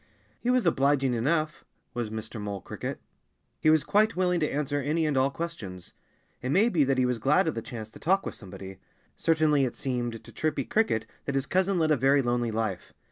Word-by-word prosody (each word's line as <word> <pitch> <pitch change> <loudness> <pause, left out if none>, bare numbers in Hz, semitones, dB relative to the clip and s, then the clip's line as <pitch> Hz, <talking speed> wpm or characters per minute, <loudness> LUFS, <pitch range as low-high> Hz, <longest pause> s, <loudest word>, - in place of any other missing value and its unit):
He 240 - -2
was 250 -3 +3
obliging 140 -4 +3
enough 155 +7 0 0.3
was 120 -3 -2
Mr. 110 0 -6
Mole 100 -2 -4
Cricket. - - -5 0.6
He 155 - +3
was 155 -1 +5
quite 215 +2 +3
willing 180 -1 +2
to 150 - +1
answer 145 0 -1
any 155 +4 0
and 150 -2 0
all 130 +1 +3
questions. 115 - -6 0.5
It 125 - -3
may 200 - +4
be 165 -9 +3
that 135 0 +1
he 130 - +3
was 125 -2 0
glad 150 - +3
of 160 - +1
the 115 - -4
chance 110 -2 -7
to - - -13
talk 190 +4 +2
with - - -4
somebody. 95 -2 -10 0.4
Certainly 155 -3 +3
it 125 - -1
seemed 120 -4 -3
to - - -13
Chirpy 155 -3 -1
Cricket 210 - +1 0.2
that 140 - -2
his 135 0 +1
cousin 190 +4 +1
led 160 -2 +2
a 150 - +4
very 135 +2 +4
lonely 120 -1 0
life. 110 -4 -3
140 Hz, 210 wpm, -28 LUFS, 115-160 Hz, 0.6 s, was